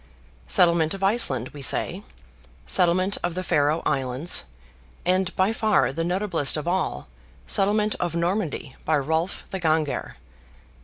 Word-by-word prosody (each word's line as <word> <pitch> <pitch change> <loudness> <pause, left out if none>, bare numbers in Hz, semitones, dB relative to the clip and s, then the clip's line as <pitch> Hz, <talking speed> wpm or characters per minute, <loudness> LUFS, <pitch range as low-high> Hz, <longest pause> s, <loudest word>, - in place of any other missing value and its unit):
Settlement 170 - +3
of 195 - -7
Iceland, 170 - +1
we 145 - -11
say; 135 - 0 0.6
settlement 180 - +2
of 175 -1 -2
the 185 - -3
Faroe 150 -1 +1
Islands, 135 +3 0 0.6
and, 185 0 +1
by 190 +4 +2
far 220 -10 +2
the 165 - -3
notablest 175 -5 +1
of 150 - -5
all, 175 - -1 0.4
settlement 210 - +1
of 175 -2 -2
Normandy 170 -5 -2
by 155 -1 +2
Rolf 160 +6 -1
the 190 - -3
Ganger 155 -3 -1
(A. - - -27
170 Hz, 140 wpm, -24 LUFS, 150-190 Hz, 0.6 s, Settlement